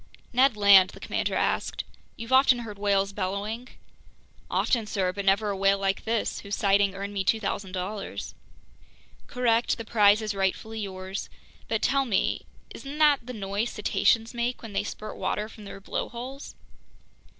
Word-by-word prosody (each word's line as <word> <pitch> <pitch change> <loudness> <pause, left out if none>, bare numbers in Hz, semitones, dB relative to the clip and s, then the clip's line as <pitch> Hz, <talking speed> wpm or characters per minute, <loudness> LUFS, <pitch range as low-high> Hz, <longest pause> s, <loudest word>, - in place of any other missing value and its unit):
"Ned 255 -2 +4
Land," 200 -2 +7
the - - -12
commander - - -2
asked, - - -1 0.3
"you've 230 +3 -5
often 260 -1 +6
heard 210 -2 -9
whales 200 -1 +1
bellowing?" 205 +5 -3 0.8
"Often, 230 -4 +1
sir, 185 -3 -1
but 200 +1 -5
never 200 +2 +3
a - - -2
whale 195 +1 +3
like 195 0 -1
this, 225 0 -1
whose 200 0 -4
sighting 200 -1 +2
earned 200 +1 -5
me 195 -1 -1
$2,000.00." 195 -1 -3 0.9
"Correct, 240 -1 +1
the 230 - -6
prize 210 -1 +4
is 215 -1 -2
rightfully 200 +3 -2
yours. 190 -1 -5 0.4
But 225 -1 -1
tell 275 +1 +2
me, 220 -6 0 0.2
isn't 280 +2 -8
that 290 -5 +4
the 250 - -5
noise 205 +2 -2
cetaceans 225 +2 +1
make 240 +1 -2
when 220 -2 -8
they - - 0
spurt 215 - -7
water 210 - -2
from 215 -1 -13
their 200 - -9
blowholes?" 250 +7 -6
210 Hz, 155 wpm, -27 LUFS, 195-230 Hz, 0.9 s, Land